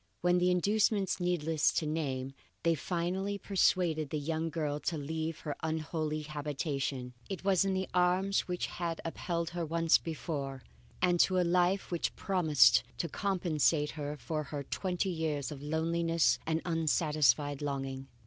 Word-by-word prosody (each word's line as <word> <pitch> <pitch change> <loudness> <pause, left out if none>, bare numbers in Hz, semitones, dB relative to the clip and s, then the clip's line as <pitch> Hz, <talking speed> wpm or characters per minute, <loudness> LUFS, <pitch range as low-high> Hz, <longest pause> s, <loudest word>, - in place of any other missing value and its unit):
When 180 0 +3
with 180 +1 +3
inducements 200 +2 +2
needless 165 -3 +1
to 160 - 0
name, 135 -4 -2 0.3
they 170 - +4
finally 180 +5 -2
persuaded 175 -6 +1
the 155 - -2
young 160 +2 -2
girl 150 -3 -2
to 160 - -2
leave 160 +2 -3
her 150 -2 -4
unholy 155 -1 -2
habitation, 145 -3 -3 0.2
it 195 -2 -5
was 195 -1 +3
in 195 -1 +1
the 190 -1 -1
arms 185 +2 +2
which 180 -1 -2
had 170 -2 -4
upheld 170 0 -2
her 175 -1 -3
once 165 0 +3
before, 140 -5 -4 0.4
and 175 -1 +3
to 185 +1 +4
a - - +4
life 180 +3 +2
which 170 - -1
promised 150 - +4 0.2
to 170 - -1
compensate 165 -5 +1
her 150 -1 -5
for 155 +5 -3
her 145 0 -5
twenty 185 +5 -2
years 155 -4 -2
of 140 -2 -7
loneliness 165 +2 +1
and 160 0 0
unsatisfied 150 -3 +2
longing. 135 -2 -3
160 Hz, 150 wpm, -32 LUFS, 150-180 Hz, 0.4 s, they